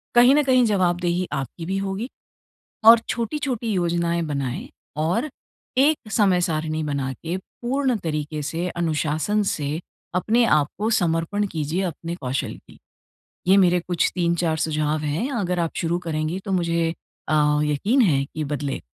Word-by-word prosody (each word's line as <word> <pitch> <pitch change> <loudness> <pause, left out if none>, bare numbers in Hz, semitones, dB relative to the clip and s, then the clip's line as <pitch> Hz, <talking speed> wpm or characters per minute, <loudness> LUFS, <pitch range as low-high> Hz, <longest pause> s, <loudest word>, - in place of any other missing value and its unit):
कहीं 245 +2 +7
न 300 - +4
कहीं 255 -2 +4
जवाबदेही 180 -3 +1
आपकी 145 +4 -4
भी 190 +3 -1
होगी 195 +5 -3 0.8
और 230 +1 +10
छोटी-छोटी 240 0 -2
योजनाएँ 170 -2 0
बनाएँ 140 -5 -3 0.3
और 185 - 0 0.5
एक 275 -5 +2
समय-सारिणी 165 -6 +1
बना 140 -3 -2
के, 165 +6 -4
पूर्ण 255 +6 -2
तरीक़े 150 -1 -3
से 165 +4 -2
अनुशासन 165 +4 0
से, 150 -5 -2 0.3
अपने 220 +6 +3
आपको 185 +4 +1
समर्पण 175 +1 +1
कीजिए 160 +3 -1
अपने 170 -1 -4
कौशल 130 -4 -3
की। - - -18 0.7
ये 190 - +7
मेरे 180 -2 +4
कुछ 175 0 0
3-4 170 -2 +1
सुझाव 155 -1 0
हैं, 155 - -2
अगर 185 -8 -1
आप 165 -1 0
शुरू 170 +1 0
करेंगी 160 0 -2
तो 195 - -3
मुझे 170 -2 +1 0.4
अ, 155 - +2 0.3
यक़ीन 175 - +1
है 140 -10 +3
कि 155 - -2
बदले 145 -1 -3
170 Hz, 140 wpm, -23 LUFS, 155-205 Hz, 0.8 s, और